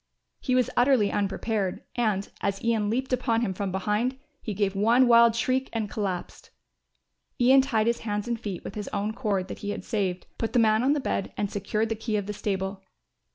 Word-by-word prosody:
He 255 - 0
was 255 -2 +2
utterly 245 -5 +4
unprepared 200 -1 -1
and, 215 -5 0
as 195 0 -2
Ian 225 -3 +1
leaped 255 +3 -1
upon 235 -2 +1
him 205 -5 -1
from 195 0 -3
behind, 210 +7 0 0.2
he 215 -4 -4
gave 200 -1 0
one 235 +6 +4
wild 235 -1 +6
shriek 260 +2 0
and 220 -3 -2
collapsed. 195 -5 -4 0.9
Ian 260 +2 +6
tied 225 -5 +1
his 235 0 +1
hands 210 0 -3
and 235 -1 -2
feet 205 -6 -5
with - - -7
his 210 -1 -5
own 210 +2 -2
cord 205 -6 -1
that - - -7
he 205 - -5
had 205 - -4
saved, 190 -5 -2
put 225 - -2
the - - +3
man 220 -1 +4
on 270 +3 +3
the 300 - 0
bed 195 -7 -2
and 205 -1 -1
secured 210 +2 -1
the 225 - -1
key 220 0 -2
of 205 - -2
the 210 - -4
stable. 195 -1 -3
215 Hz, 205 wpm, -26 LUFS, 200-240 Hz, 0.9 s, wild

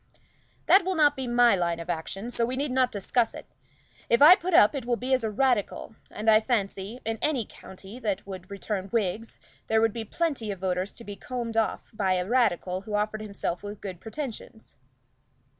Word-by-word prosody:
"That 385 0 +6
will 375 +1 -1
not 295 -2 +4
be 265 -2 -4
my 240 -2 +5
line 170 -2 -1
of 165 - -7
action, 185 +7 -4
so 235 - 0
we 245 +2 -1
need 275 +1 -2
not 255 -1 +2
discuss 225 +3 0
it. - - -9 0.6
If 235 - +4
I 300 +5 +10
put 365 -1 0
up 210 - +7
it 275 -3 -4
will 240 0 0
be 255 +3 -2
as 255 -2 +2
a 220 - 0
Radical; 225 -1 0
and 215 +1 -7
I 215 -1 +7
fancy, 215 -1 -2
in 225 0 -2
any 275 -7 0
county 190 +5 -12
that 205 -5 -2
would 185 -2 -9
return 200 -1 -4
Whigs 225 0 -2 0.3
there 220 - +3
would 225 -1 +2
be 230 - -4
plenty 275 -2 -2
of 200 - -3
voters 185 +1 -2
to 235 - -12
be 205 -2 -7
combed 235 0 -5
off 225 -1 -1
by 195 -3 +1
a 180 0 -1
Radical 190 -6 +1
who 210 +1 -5
offered 215 +1 -1
himself 200 -4 -4
with 205 0 -7
good 185 -4 -7
pretensions." 225 -2 -7
220 Hz, 205 wpm, -27 LUFS, 195-250 Hz, 0.6 s, I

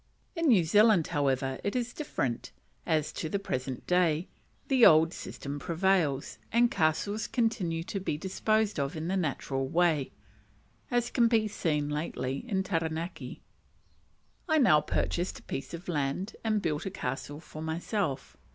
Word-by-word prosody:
In 330 -1 0
New 215 -10 +6
Zealand, 205 0 +5
however, 135 -3 0
it 200 - -2
is 245 -1 -1
different, 135 - -3 0.4
as, 155 -1 +1
to 160 - -4
the 200 - 0
present 130 -9 -4
day, 175 -2 +2 0.4
the 260 -3 +3
old 160 0 +7
system 140 +1 -6
prevails, 170 -4 0
and 235 +1 +4
castles 200 +7 0
continue 190 -9 0
to 195 - -4
be 180 -5 -2
disposed 215 +3 0
of 140 +2 -2
in 160 +2 -3
the 190 - 0
natural 135 -5 -1
way, 160 -2 +2 0.8
as 245 -2 +1
has 235 -2 +5
been 220 -2 +3
seen 150 -7 -1
lately 150 -3 -3
at 190 -2 0
Taranaki. 165 -1 -3 1.1
I 315 - +4
now 195 - +5
purchased 175 +4 -1
a - - -14
piece 135 - -5
of 170 +2 -8
land 155 +4 -2
and 215 -2 +1
built 150 +3 -1
a - - -1
"castle" 145 -3 -5
for 155 -1 -10
myself. 160 -2 -2
170 Hz, 150 wpm, -29 LUFS, 150-205 Hz, 1.1 s, old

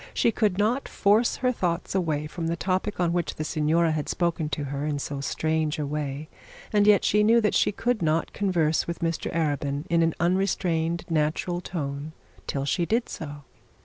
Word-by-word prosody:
She 230 - +3
could 210 -5 +1
not 225 +7 +1
force 210 +4 +3
her 255 -1 +1
thoughts 175 -7 -2
away 160 -6 0
from 165 +2 -4
the 165 - 0
topic 190 +3 -1
on 170 -1 +2
which 175 -2 -1
the 155 - -3
signora 160 +2 +2
had 155 -2 -2
spoken 170 -3 0
to 145 0 -3
her 140 0 -4
in 150 -1 -1
so 140 0 -4
strange 155 +1 -1
a 150 - -2
way, 145 0 -4 0.5
and 205 0 +4
yet 210 -1 +5
she 210 - +3
knew 230 +2 +5
that 210 - +1
she - - +3
could 240 +2 -1
not 160 0 0
converse 170 -6 +1
with 170 - -4
Mr 165 -1 -1
Arabin 145 -2 -1
in 170 -1 +4
an 165 -1 +2
unrestrained 170 -2 0
natural 165 +2 0
tone 150 -3 -5 0.3
till 140 -1 -2
she 170 +5 +1
did 230 +2 0
so. 145 -2 -7
165 Hz, 190 wpm, -26 LUFS, 150-190 Hz, 0.5 s, yet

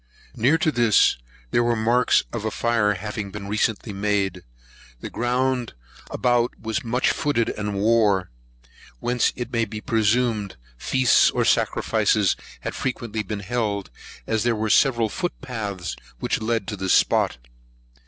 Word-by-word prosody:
Near 135 +8 +3
to 160 -1 +1
this, 120 -5 +4 0.3
there 120 - +3
were 120 0 +1
marks 115 +3 +3
of 115 -3 -3
a 110 - 0
fire 110 -2 +1
having 105 +1 -5
been 100 0 -7
recently 105 +1 -1
made. 100 -2 -1 0.6
The - - -7
ground 125 0 -1 0.4
about 120 -1 +1
was 110 +6 -3
much 125 +2 +1
footed 130 -6 0
and 105 -1 -3
wore; 105 - +2 0.7
whence 120 - +1
it 120 0 -6
may 115 -1 +2
be 110 -1 -5
presumed 110 -2 0 0.2
feasts 130 - +3
or - - 0
sacrifices - - +2 0.3
had - - -4
been - - -7
frequently 110 -5 -3
held, 105 - -2 0.3
as 110 -1 0
there 120 +1 +1
were 110 0 -1
several 120 -4 +4
foot 175 - -4
paths 100 - -5 0.2
which - - -2
led 115 +1 -1
to 105 - -3
this 95 -1 0
spot. - - +3
110 Hz, 145 wpm, -23 LUFS, 105-120 Hz, 0.7 s, this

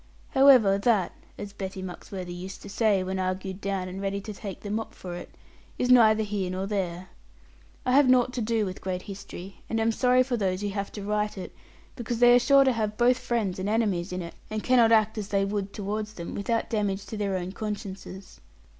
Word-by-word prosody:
However, 255 -8 +6
that 205 -4 +2 0.3
(as 200 -1 -7
Betty 190 -1 -6
Muxworthy 180 0 -7
used 185 +2 -8
to - - -9
say, 200 -2 +2
when 190 +1 -3
argued 185 +1 -3
down, 195 -2 -2
and 185 +1 -6
ready 200 0 -2
to 215 +1 -7
take 200 -1 -7
the 205 - -6
mop 220 +1 -3
for 180 -2 -7
it) 175 - -7 0.5
is 250 - +1
neither 220 -3 +6
here 200 -3 -2
nor 185 +1 -3
there. 185 -3 -3 0.8
I 250 - +1
have 275 0 +5
naught 250 0 +4
to 250 - -2
do 220 -1 +1
with 185 -1 -6
great 185 -1 -3
history 195 -1 -9
and 225 - 0
am 225 +1 +2
sorry 250 +2 +3
for 255 -1 -2
those 190 -2 -1
who 205 - -1
have 200 0 -4
to 205 - -6
write 210 0 -1
it; 185 - -7 0.4
because 240 -1 -3
they 245 +1 +7
are 245 - +7
sure 275 +3 +5
to 265 - +3
have 215 -2 -2
both 250 +1 +4
friends 210 -6 -1
and 190 +2 -2
enemies 200 -5 0
in 180 0 -3
it, 170 - -8 0.2
and 215 0 -3
cannot 240 -3 +5
act 220 0 +3
as 205 - -4
they 195 -1 +1
would 200 -1 -3
towards 210 +1 -4
them, 170 -1 -6
without 230 +4 -1
damage 205 -3 -1
to - - -7
their 200 -2 -1
own 180 0 -4
consciences. 200 -2 -7
205 Hz, 215 wpm, -27 LUFS, 190-225 Hz, 0.8 s, they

